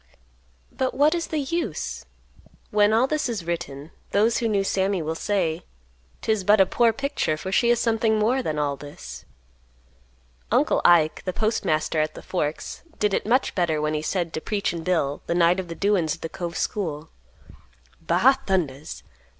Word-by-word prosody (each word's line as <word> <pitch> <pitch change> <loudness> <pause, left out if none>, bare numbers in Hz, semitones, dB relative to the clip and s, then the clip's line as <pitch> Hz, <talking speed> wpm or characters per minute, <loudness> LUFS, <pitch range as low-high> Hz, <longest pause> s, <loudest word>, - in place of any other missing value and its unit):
But 260 -1 -2
what 295 +3 +4
is 340 -1 -2
the 315 - -3
use? 330 +5 -3 0.7
When 210 0 +4
all 225 +3 +4
this 300 -1 -1
is 210 -8 -4
written, 165 -3 -5 0.2
those 220 +3 +3
who 230 - 0
knew 205 -3 +1
Sammy 195 0 0
will 160 0 -2
say, 170 -2 -1 0.6
"'Tis 220 -3 +1
but 205 +2 +5
a 190 - +7
poor 230 +4 +3
picture, 275 - -1
for 190 +4 -5
she 235 +4 +3
is 240 -1 +3
something 225 -2 +2
more 235 +5 +2
than 155 -11 -3
all 145 -1 0
this." 145 +1 -10 1.3
Uncle - - +3
Ike, 160 -3 +4
the 185 - -2
postmaster 160 -7 0
at 155 - -2
the - - -10
Forks, 155 -4 -3 0.2
did 210 -1 +1
it - - -1
much 255 +4 +2
better 170 -4 0
when 150 0 -1
he 150 - -1
said 170 0 -2
to 155 - -3
"Preachin' 200 -5 -2
Bill," 160 -6 0
the 170 - 0
night 175 +1 +4
of 185 - -4
the 165 - -6
"Doin's" 195 -6 +1
at - - -20
the 165 - -3
Cove 170 -1 -5
School, 160 -7 -3 0.9
"Ba 205 +12 +3
thundas! 155 -7 -2
190 Hz, 175 wpm, -24 LUFS, 160-220 Hz, 1.3 s, a